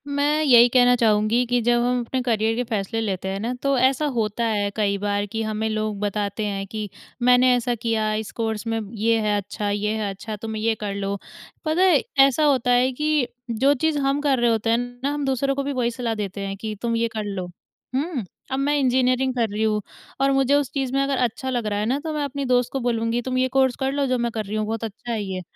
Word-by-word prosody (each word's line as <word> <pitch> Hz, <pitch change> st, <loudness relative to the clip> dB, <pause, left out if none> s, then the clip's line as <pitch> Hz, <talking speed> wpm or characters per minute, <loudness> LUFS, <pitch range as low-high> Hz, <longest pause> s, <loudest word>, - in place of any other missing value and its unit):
मैं 290 Hz, +2 st, +1 dB
यही 245 Hz, -4 st, +7 dB
कहना 245 Hz, 0 st, +5 dB
चाहूँगी 225 Hz, +1 st, +2 dB
कि 245 Hz, 0 st, +1 dB
जब 240 Hz, +1 st, +2 dB
हम 250 Hz, 0 st, +1 dB
अपने 260 Hz, +2 st, -2 dB
करियर 225 Hz, -2 st, +1 dB
के 245 Hz, -, 0 dB
फ़ैसले 220 Hz, +1 st, -2 dB
लेते 190 Hz, -4 st, -3 dB
हैं 195 Hz, +1 st, -3 dB
ना 235 Hz, +4 st, -2 dB
तो 275 Hz, -1 st, +2 dB
ऐसा 265 Hz, +4 st, +2 dB
होता 220 Hz, 0 st, -1 dB
है 205 Hz, -3 st, 0 dB
कई 200 Hz, -2 st, +1 dB
बार 205 Hz, 0 st, -1 dB
कि 220 Hz, +2 st, -4 dB
हमें 215 Hz, 0 st, -2 dB
लोग 215 Hz, -1 st, -2 dB
बताते 205 Hz, +1 st, -2 dB
हैं 195 Hz, -1 st, -3 dB
कि 210 Hz, 0 st, -5 dB, 0.3 s
मैंने 250 Hz, +1 st, +5 dB
ऐसा 245 Hz, 0 st, 0 dB
किया 220 Hz, -2 st, -1 dB
इस 215 Hz, 0 st, -3 dB
कोर्स 220 Hz, -1 st, -2 dB
में 225 Hz, 0 st, 0 dB, 0.2 s
ये 225 Hz, +2 st, +2 dB
है 210 Hz, -1 st, +1 dB
अच्छा 205 Hz, +1 st, -3 dB
ये 205 Hz, +1 st, -1 dB
है 210 Hz, -2 st, -2 dB
अच्छा 205 Hz, +3 st, -6 dB
तुम 220 Hz, +1 st, -6 dB
ये 220 Hz, +1 st, +1 dB
कर 210 Hz, -2 st, -4 dB
लो। 200 Hz, 0 st, -2 dB, 0.5 s
पता 315 Hz, +3 st, +1 dB
है 360 Hz, -7 st, +5 dB, 0.3 s
ऐसा 275 Hz, +3 st, 0 dB
होता 260 Hz, -4 st, +3 dB
है 250 Hz, +1 st, +4 dB
कि 300 Hz, -1 st, +1 dB, 0.2 s
जो 265 Hz, +6 st, +3 dB
चीज़ 305 Hz, +2 st, 0 dB
हम 275 Hz, +1 st, +1 dB
कर 280 Hz, -3 st, +2 dB
रहे 240 Hz, 0 st, +3 dB
होते 225 Hz, 0 st, 0 dB
हैं 230 Hz, -, +4 dB, 0.3 s
ना 280 Hz, -, +1 dB
हम 290 Hz, -1 st, -2 dB
दूसरों 270 Hz, +1 st, 0 dB
को 280 Hz, -, -1 dB
भी 285 Hz, -, -2 dB
वही 245 Hz, -2 st, 0 dB
सलाह 235 Hz, -1 st, -3 dB
देते 200 Hz, -2 st, -4 dB
हैं 195 Hz, 0 st, -5 dB
कि 215 Hz, +1 st, -5 dB
तुम 235 Hz, -1 st, 0 dB
ये 230 Hz, 0 st, +1 dB
कर 215 Hz, -, -2 dB
लो। 195 Hz, -3 st, -4 dB, 0.5 s
हुँ, 280 Hz, -2 st, -1 dB, 0.3 s
अब 265 Hz, -, 0 dB
मैं 290 Hz, +2 st, +1 dB
इंजीनियरिंग 255 Hz, 0 st, +2 dB
कर 230 Hz, -3 st, +1 dB
रही 210 Hz, +2 st, -2 dB
हूँ 215 Hz, -1 st, +1 dB, 0.4 s
और 275 Hz, 0 st, +4 dB
मुझे 270 Hz, 0 st, +2 dB
उस 285 Hz, -2 st, 0 dB
चीज़ 270 Hz, -2 st, -2 dB
में 275 Hz, -, +2 dB
अगर 275 Hz, -1 st, 0 dB
अच्छा 245 Hz, +2 st, -2 dB
लग 245 Hz, -3 st, -1 dB
रहा 205 Hz, -1 st, -1 dB
है 210 Hz, -, 0 dB
ना 260 Hz, +5 st, 0 dB
तो 320 Hz, -1 st, -3 dB
मैं 300 Hz, -1 st, -1 dB
अपनी 280 Hz, 0 st, -3 dB
दोस्त 250 Hz, -1 st, +2 dB
को 270 Hz, -, -1 dB
बोलूँगी 235 Hz, -1 st, 0 dB
तुम 255 Hz, +1 st, -2 dB
ये 255 Hz, 0 st, +2 dB
कोर्स 260 Hz, -2 st, +3 dB
कर 265 Hz, 0 st, 0 dB
लो 280 Hz, 0 st, 0 dB
जो 255 Hz, 0 st, +1 dB
मैं 235 Hz, -1 st, -1 dB
कर 220 Hz, -1 st, -3 dB
रही 205 Hz, +2 st, -5 dB
हूँ 215 Hz, 0 st, 0 dB
बहुत 225 Hz, +1 st, -3 dB
अच्छा 225 Hz, +2 st, -6 dB
है 225 Hz, -2 st, -1 dB
ये 190 Hz, -2 st, -4 dB
235 Hz, 250 wpm, -23 LUFS, 215-265 Hz, 0.5 s, यही